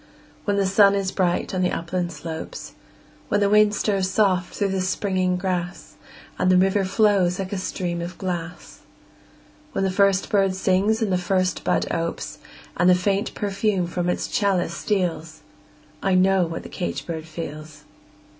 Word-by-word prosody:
When 205 -1 +1
the 200 - +2
sun 200 +1 +5
is 195 -1 -1
bright 180 -1 0
on 185 - 0
the 180 - +1
upland 175 +1 -2
slopes; 160 +1 -7 0.5
When 205 - +1
the 200 -1 +2
wind 210 0 +5
stirs 195 -3 0
soft 190 -3 +1
through 200 -1 0
the 190 -1 -1
springing 185 -1 0
grass, 180 -1 -3 0.5
And 185 - +2
the 185 - +5
river 195 +1 +3
flows 190 -3 +2
like 195 0 -4
a 195 - -2
stream 175 -2 -3
of 175 +1 -6
glass; 175 -2 -5 0.9
When - - 0
the 190 - +1
first 195 0 +2
bird 195 -2 +2
sings 195 +4 +1
and 200 -4 0
the 180 - +2
first 185 0 0
bud - - +1
opes, 165 0 -3 0.4
And 175 +1 +3
the 180 - +7
faint 195 +2 -1
perfume 200 -2 0
from 175 +1 -2
its - - -1
chalice 190 -4 0
steals 165 -5 -2 0.6
I 195 -1 +2
know 185 -1 +3
what 165 - -6
the - - -9
caged 180 - -4
bird 160 -2 -5
feels! 155 -1 -8
185 Hz, 170 wpm, -23 LUFS, 175-195 Hz, 0.9 s, the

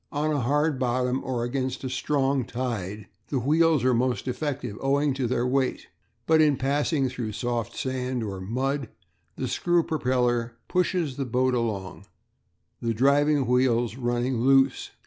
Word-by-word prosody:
On 150 +1 0
a 145 - +1
hard 145 +3 +1
bottom 125 +1 0
or 125 -2 -2
against 130 +1 -2
a - - -2
strong 135 -1 +1
tide 110 -5 -4 0.2
the 140 - -1
wheels 155 +2 +3
are 130 0 +3
most 125 -1 0
effective 130 -3 -3
owing 140 +1 +2
to 130 -2 -1
their 120 0 0
weight, 130 0 -1 0.4
but 160 -1 +4
in 150 -3 +4
passing 140 +1 +1
through 120 -4 -4
soft 120 +1 -3
sand 130 -2 -2
or 100 -3 -5
mud 130 +5 -2 0.5
the 130 - -3
screw 175 +5 +1
propeller 125 -6 0
pushes 180 -6 0
the 135 - -2
boat 125 +1 +1
along, 100 -6 -3 0.7
the 115 -1 -1
driving 140 +3 +3
wheels 120 -2 +2
running 120 0 -1
"loose." 135 +2 +3
130 Hz, 150 wpm, -26 LUFS, 120-140 Hz, 0.7 s, but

